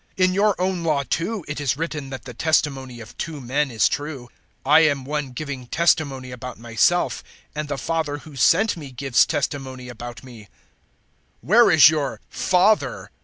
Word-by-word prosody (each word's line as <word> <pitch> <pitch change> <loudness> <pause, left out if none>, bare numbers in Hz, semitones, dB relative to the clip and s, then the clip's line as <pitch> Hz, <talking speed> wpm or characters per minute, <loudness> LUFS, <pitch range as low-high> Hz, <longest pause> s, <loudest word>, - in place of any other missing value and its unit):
008:017 185 - +4
In 185 - +1
your 200 0 +2
own 185 -1 -1
Law, 150 -4 +1
too, 180 - -2
it 145 0 -4
is 135 -2 0
written 155 -4 -4
that 130 -1 -8
the 125 - -8
testimony 135 -3 0
of 110 - -12
two 160 -3 -4
men 135 +3 -1
is 110 -4 +2
true. 145 -4 -5 0.3
008:018 140 - -1
I 155 - +9
am 145 -4 +2
one 145 -1 -3
giving 135 -1 -6
testimony 140 -5 +1
about 125 0 -8
myself, 115 +10 +1 0.3
and 150 0 -4
the 145 -1 -3
Father 155 0 -2
who 150 0 -13
sent 185 - +3
me 150 -5 -9
gives 130 0 +2
testimony 130 -3 -3
about 120 +1 -9
me." 120 -5 -12
008:019 - - -26 0.9
"Where 230 +6 +5
is 155 -3 +8
your 150 -3 -2
Father?" 190 +4 +1
145 Hz, 180 wpm, -22 LUFS, 130-165 Hz, 0.9 s, I